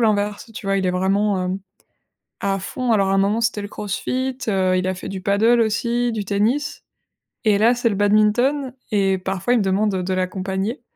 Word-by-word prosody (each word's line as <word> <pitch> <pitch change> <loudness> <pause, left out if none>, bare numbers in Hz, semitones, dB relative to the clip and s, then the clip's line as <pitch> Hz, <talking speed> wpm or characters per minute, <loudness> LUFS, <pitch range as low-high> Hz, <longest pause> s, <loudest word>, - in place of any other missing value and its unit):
l'inverse, 210 0 0
tu 220 - -8
vois? 195 0 +1
Il 190 -1 0
est - - +2
vraiment, 190 +1 +1
hem, 185 +1 -2 0.8
à 195 0 0
fond. 250 +4 -2
Alors 195 -3 +3
à - - +1
un - - +3
moment, 205 +4 +2
c'était 230 -2 0
le - - -4
CrossFit, 255 +6 -3
heu, 185 -2 +2
il 185 - -1
a 185 - -1
fait 185 - -8
du 190 -1 -5
paddle 215 +5 +3
aussi, 235 +2 0
du 215 -2 -3
tennis. 215 +9 0 0.6
Et 210 -2 +4
là, 235 +3 +4
c'est 235 -1 +1
le 205 - -1
badminton. 215 +7 +2 0.2
Et 195 -2 +2
parfois, 190 +5 -1
il - - +4
me - - +1
demande 195 +2 +1
heu, 185 - -1
de 185 - -2
l'accompagner. 190 +5 -2
205 Hz, 210 wpm, -21 LUFS, 195-230 Hz, 0.8 s, Et